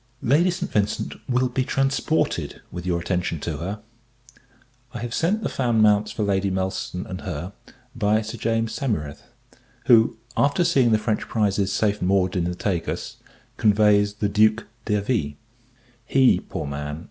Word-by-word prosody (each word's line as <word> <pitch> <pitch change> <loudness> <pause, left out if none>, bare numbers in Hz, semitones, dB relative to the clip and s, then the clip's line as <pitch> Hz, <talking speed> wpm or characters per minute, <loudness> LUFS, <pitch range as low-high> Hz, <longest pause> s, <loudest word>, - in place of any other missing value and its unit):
Lady 150 +9 +4
St. 175 +1 -3
Vincent 105 -1 -1 0.2
will 125 0 +2
be 130 +1 -1
transported 135 +4 0
with 90 0 -6
your 85 -1 +1
attention 90 -2 -2
to 80 -3 -3
her. 100 +7 -5 1.1
I - - -3
have 120 +1 -5
sent 200 - 0
the - - 0
fan 120 -4 0
mounts 105 -1 +4
for 110 - -2
Lady 100 -1 +1
Nelson 95 -1 -3
and 95 +1 -7
her, 90 +1 -5 0.4
by 110 -1 +2
Sir 110 +2 -7
James 115 0 0
Saumarez; 105 - -3 0.6
who, 115 -2 +5 0.2
after 145 +5 +2
seeing 135 -9 +3
the 110 - +5
French 110 0 -2
prizes 100 -3 0
safe 105 0 0
moored 95 0 +1
in 90 -2 0
the 90 0 -2
Tagus, 90 -3 -3 0.4
conveys 105 -1 +3
the 105 -1 0
Duke 110 +2 +3 0.2
d'Hervie. 105 - 0 0.7
He, 130 -2 +4
poor - - -6
man! 75 +2 -5
105 Hz, 155 wpm, -23 LUFS, 95-120 Hz, 1.1 s, who